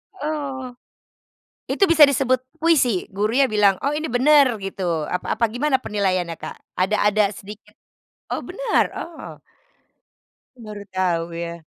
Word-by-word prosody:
Oh, 285 -6 -4 1.0
itu - - 0
bisa 315 -2 +7
disebut 260 -2 +1 0.2
puisi? 260 - +2
Gurunya 215 +7 +2
bilang, 205 -2 +4
"Oh 280 - +1
ini 310 +1 -2
bener," 280 +4 +5 0.2
gitu 175 -5 -2
apa 180 - -2
apa 230 +1 +2
gimana 265 +3 +1
penilaiannya, 185 -5 -1
Kak? - - -7 0.2
Ada 195 +4 +2 0.2
ada 210 +1 +3
sedikit 205 +1 -12 0.6
oh - - -2
bener, - - +1
oh. 335 -2 -9 1.2
Aku 235 - -12
baru 205 - -8
tahu 180 -3 -1
ya. 170 0 -6
220 Hz, 135 wpm, -22 LUFS, 185-280 Hz, 1.2 s, bisa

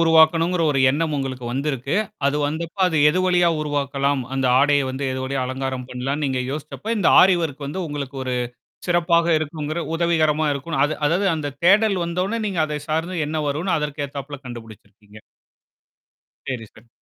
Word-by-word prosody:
உருவாக்கணுங்கிற 165 +1 +4
ஒரு 135 - 0
எண்ணம் 155 +2 -1
உங்களுக்கு 130 -2 -4
வந்திருக்கு. 135 +3 -2 0.3
அது 140 - +1
வந்தப்ப 165 +5 -4
அது 160 -4 0
எது 170 - +1
வழியா 180 -1 +3
உருவாக்கலாம்? 140 -1 -1
அந்த 135 -1 0
ஆடைய 145 -1 +3
வந்து 135 +2 -4
எது 130 - -4
வழிய 135 +1 -2
அலங்காரம் 130 0 -3
பண்ணலான்னு 135 +4 -2
நீங்க 130 -1 -1
யோசிச்சப்ப, 155 +7 -7
இந்த 200 - +3
ஆரி 190 0 +6
ஒர்க் 145 -2 -4
வந்து 150 +7 -4
உங்களுக்கு 140 -2 -5
ஒரு 130 -1 -2 0.5
சிறப்பாக 170 -1 +3
இருக்குங்கிற 155 +1 -4 0.2
உதவிகரமா 155 -2 +2
இருக்குன்னு 140 +1 -3
அது 155 - -2
அதாவது 180 +6 +1
அந்த 145 -3 -4
தேடல் 200 +1 +5
வந்தோன்னே, 185 +6 -2
நீங்க 190 -4 -2
அதை 150 -1 -3
சார்ந்து 165 +4 -1
என்ன 155 +1 -2
வருன்னு 160 +7 0
அதற்கு 150 -1 -3
ஏத்தாப்ல 140 +1 -7
கண்டுபிடிச்சிருக்கீங்க. 110 -3 -12 1.3
சரி, 125 -4 -3
சரி. 115 +2 -18
150 Hz, 160 wpm, -22 LUFS, 135-165 Hz, 1.3 s, ஆரி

